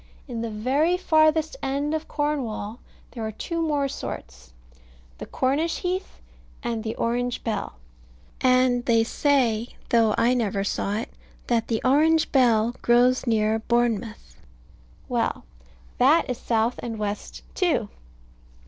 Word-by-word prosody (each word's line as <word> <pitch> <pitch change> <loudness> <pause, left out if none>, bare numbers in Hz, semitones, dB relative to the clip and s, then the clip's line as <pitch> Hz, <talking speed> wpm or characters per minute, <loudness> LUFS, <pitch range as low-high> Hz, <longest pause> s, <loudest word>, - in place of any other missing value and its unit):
In 235 -4 -4
the 230 - -3
very 270 +11 +1
farthest 315 0 +3
end 280 +3 -1
of 315 0 -3
Cornwall 255 -7 -3 0.3
there 230 - -6
are 220 - -3
two 335 - -4
more 295 -3 +1
sorts, - - -8 0.7
the - - -7
Cornish 285 +6 0
heath 365 +1 -3 0.4
and 230 -2 -2
the 220 0 -3
Orange 245 +1 -1
bell; 225 - -3 0.7
and 255 -1 +3
they 230 -2 +4
say 240 -3 +1
(though 225 -3 +3
I 240 +2 +3
never 205 -5 0
saw 200 0 -1
it) 225 - -5 0.3
that 230 -2 0
the 225 -2 -1
Orange 310 +4 +3
bell 235 -3 +3
grows 245 +2 +3
near 220 -1 +2
Bournemouth. 225 - -1 0.7
Well. - - -1 0.6
That 290 +7 +5
is 250 -3 -3
south 230 +1 0
and 230 -2 -5
west 210 -1 -5
too. 340 - 0
240 Hz, 130 wpm, -24 LUFS, 220-285 Hz, 0.7 s, That